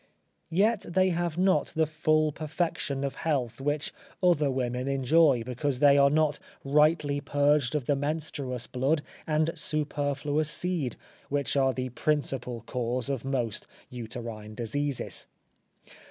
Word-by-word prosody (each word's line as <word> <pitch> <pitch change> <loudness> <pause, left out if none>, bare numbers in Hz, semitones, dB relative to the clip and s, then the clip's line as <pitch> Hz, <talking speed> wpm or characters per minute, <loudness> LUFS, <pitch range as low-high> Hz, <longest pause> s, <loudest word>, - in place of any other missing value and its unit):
Yet 205 +6 +2
they 185 +2 +3
have 170 -1 -1
not 185 +1 +3
the 160 0 +3
full 155 0 +2
perfection 150 -3 -2
of 140 -1 -2
health 135 -6 -1
which 145 +2 -1 0.3
other 160 -5 +4
women 125 -1 -2
enjoy, 135 -1 +4
because 125 +3 -2
they 140 +1 +6
are 140 0 +6
not 150 0 +2 0.3
rightly 150 0 +3
purged 145 -2 +2
of 145 -5 -1
the 145 - +2
menstruous 140 -4 -3
blood 135 +6 0 0.2
and 155 +1 +2
superfluous 145 -1 -1
seed, 160 -6 -1 0.3
which 140 0 -1
are 135 -1 +3
the 130 0 -2
principal 125 -3 -1
cause 125 +2 -2
of 135 -4 -3
most 125 -5 -2 0.2
uterine 115 -3 -7
diseases. 135 +5 -3
145 Hz, 130 wpm, -28 LUFS, 130-155 Hz, 0.3 s, they